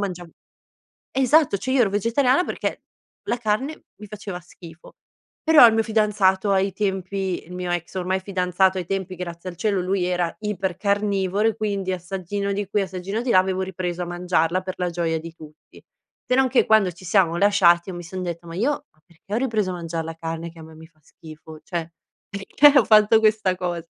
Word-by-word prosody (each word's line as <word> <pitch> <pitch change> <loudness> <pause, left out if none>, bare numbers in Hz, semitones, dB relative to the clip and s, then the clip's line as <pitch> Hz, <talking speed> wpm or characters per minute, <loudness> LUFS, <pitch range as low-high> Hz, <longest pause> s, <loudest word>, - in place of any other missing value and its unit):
mangiav 180 -4 -4 0.8
esatto, 270 -2 +3
cioè 260 +7 -4
io 260 -1 +4
ero 215 - +3
vegetariana 250 - +2
perché - - -4 0.4
la - - +1
carne 240 +7 -2 0.2
mi 210 - -10
faceva 205 -3 -7
schifo. 170 -1 -15 0.5
Però 315 -5 +8
il 230 - +6
mio 225 - +2
fidanzato 210 -3 +1
ai 195 0 +1
tempi, 190 -1 -2
il 180 - -12
mio 180 -1 -3
ex, 175 +1 -4
ormai, 185 +1 -1
fidanzato 190 0 +1
ai 180 - -3
tempi, 190 0 -3
grazie 175 0 -7
al 175 - -10
cielo, 200 0 0
lui 185 0 -1
era 180 -2 -1
ipercarnivoro 200 0 -1
e 225 - 0
quindi 200 -4 -2
assaggino 190 +2 -4
di 200 -1 -4
qui, 205 -1 +1
assaggino 190 +3 -4
di 245 - 0
là, 185 - +6
avevo 185 0 -1
ripreso 180 -1 -4
a - - -5
mangiarla, 175 0 0
per 185 0 -6
la 180 -1 -2
gioia 165 -1 -1
di 165 +1 -9
tutti. 155 -2 -16 0.4
Se 250 - +2
non 265 0 +3
che 255 - +3
quando 215 -4 +4
ci 175 +2 -16
siamo 175 -2 +2
lasciati, 185 -3 +4
io 185 - -6
mi 175 - -7
son 185 +2 -6
detta: 170 -1 -5
"Ma 165 - -9
io, 225 +10 +1 0.2
ma 155 - -34
perché 175 +4 -13
ho 220 - +1
ripreso 220 -7 0
a - - -4
mangia 165 -1 -4
la 165 0 -6
carne 165 +1 -5
che 165 - -16
a - - -10
me 160 0 -13
mi 160 +1 -13
fa 160 -1 -25
schifo? 155 0 -13
Cioè 170 -2 -5 0.4
perché 275 +9 +4
ho - - +3
fatto 215 +1 +6
questa 215 -4 +2
cos" 175 -2 -4
190 Hz, 205 wpm, -23 LUFS, 175-210 Hz, 0.8 s, Però